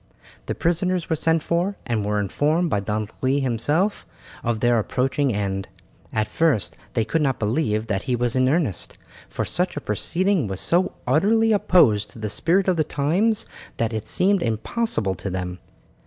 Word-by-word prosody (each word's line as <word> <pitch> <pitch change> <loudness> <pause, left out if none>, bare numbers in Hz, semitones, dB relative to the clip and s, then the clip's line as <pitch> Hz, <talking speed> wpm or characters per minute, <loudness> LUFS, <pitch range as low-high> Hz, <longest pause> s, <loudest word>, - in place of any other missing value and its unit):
The - - -2
prisoners 175 +1 0
were - - +3
sent 160 0 +1
for, 175 +4 0
and 115 -3 -1
were 105 0 0
informed 150 - 0
by 100 - +2
Don 105 +1 -2
Louis 135 +2 +2
himself 145 - 0 0.4
of 115 -1 -1
their 120 0 +3
approaching 135 +5 0
end. 95 -2 -2 0.4
At 110 -1 0
first 105 - +1 0.2
they 115 -3 +1
could 155 +9 0
not 135 -3 +1
believe 110 -1 0
that 105 -4 -1
he 125 - +2
was 120 0 0
in 130 0 +3
earnest, 145 - -1 0.3
for - - -3
such 180 -2 0
a - - 0
proceeding 170 - 0
was 95 -1 -4
so 175 +2 +1
utterly 215 - +3
opposed 150 - +4
to - - -14
the 110 -2 -4
spirit 180 - +1
of 185 -2 +2
the 155 - +3
times 175 +10 +1 0.3
that 115 0 -1
it 110 -1 -4
seemed 195 0 +2
impossible 115 - -1
to 95 +2 -5
them. 90 -1 -4
130 Hz, 175 wpm, -23 LUFS, 105-170 Hz, 0.4 s, opposed